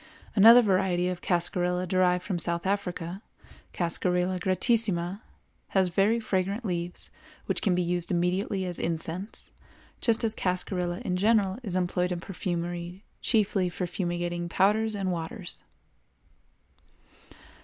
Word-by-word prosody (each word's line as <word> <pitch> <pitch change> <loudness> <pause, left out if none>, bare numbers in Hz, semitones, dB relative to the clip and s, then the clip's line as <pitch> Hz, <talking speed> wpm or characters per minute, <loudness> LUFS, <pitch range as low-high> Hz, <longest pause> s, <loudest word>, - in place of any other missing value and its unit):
Another 230 +4 +9
variety 185 -3 +2
of 180 -1 -4
cascarilla 180 0 0
derived 180 0 +2
from 185 -2 -2
South 170 +1 0
Africa, 185 -2 -2 0.5
Cascarilla 180 +1 0
gratissima, 190 -2 +1 0.6
has 190 -1 +4
very 200 +6 +2
fragrant 200 +1 -1
leaves 175 -2 -3 0.3
which - - -1
can 190 -4 +2
be 180 - +1
used 175 0 -1
immediately 185 +2 0
as 180 -1 -4
incense, 170 +5 -4 0.5
just 230 -1 +2
as 220 -1 +1
cascarilla 180 -2 -2
in 180 -1 0
general 205 0 +2
is 195 -7 -4
employed 180 0 0
in 175 - -2
perfumery 175 0 -4 0.2
chiefly 200 -5 +2
for 180 +1 -3
fumigating 175 -1 -3
powders 215 +5 +2
and 195 -2 -1
waters. 175 +3 -5
180 Hz, 120 wpm, -28 LUFS, 175-195 Hz, 0.6 s, Another